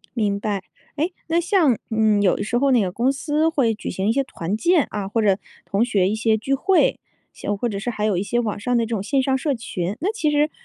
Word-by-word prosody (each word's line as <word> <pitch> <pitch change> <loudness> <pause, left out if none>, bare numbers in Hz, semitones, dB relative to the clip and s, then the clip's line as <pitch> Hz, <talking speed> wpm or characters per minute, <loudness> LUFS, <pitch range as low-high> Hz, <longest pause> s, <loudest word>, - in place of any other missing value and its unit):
明 205 -4 0
白。 200 -2 -2 0.3
诶 320 +5 -1 0.2
那 335 +1 +2
像， 340 - +2
嗯， 220 -2 +3
有 185 - +4
的 - - -3
时 240 +3 0
候 275 +2 +2
那 240 - +4
个 185 - -1
公 240 +8 +1
司 300 +3 0
会 255 -9 +1
举 - - -6
行 190 +3 -2
一 225 - +4
些 275 +2 +1
团 190 -3 -4
建 340 +2 +3
啊， 205 -2 -3
或 220 +2 0
者 195 -2 +3 0.3
同 200 +4 +1
学 200 -6 +2
一 205 - 0
些 220 0 +2
聚 270 +6 -1
会， 380 - +3 0.4
一 - - -23
些 - - -2
或 205 +4 -1
者 200 -2 -3
是 215 - -5
还 215 -2 -3
有 210 -4 +1
一 185 - 0
些 240 +4 0
网 215 -4 -2
上 245 +4 0
的 230 - +2
这 - - -6
种 225 -4 -2
线 265 +5 +1
上 265 0 +1
社 285 0 0
群。 200 -4 -4
那 390 +7 0
其 320 -9 0
实 295 +1 +2
230 Hz, 285 characters per minute, -22 LUFS, 205-280 Hz, 0.4 s, 有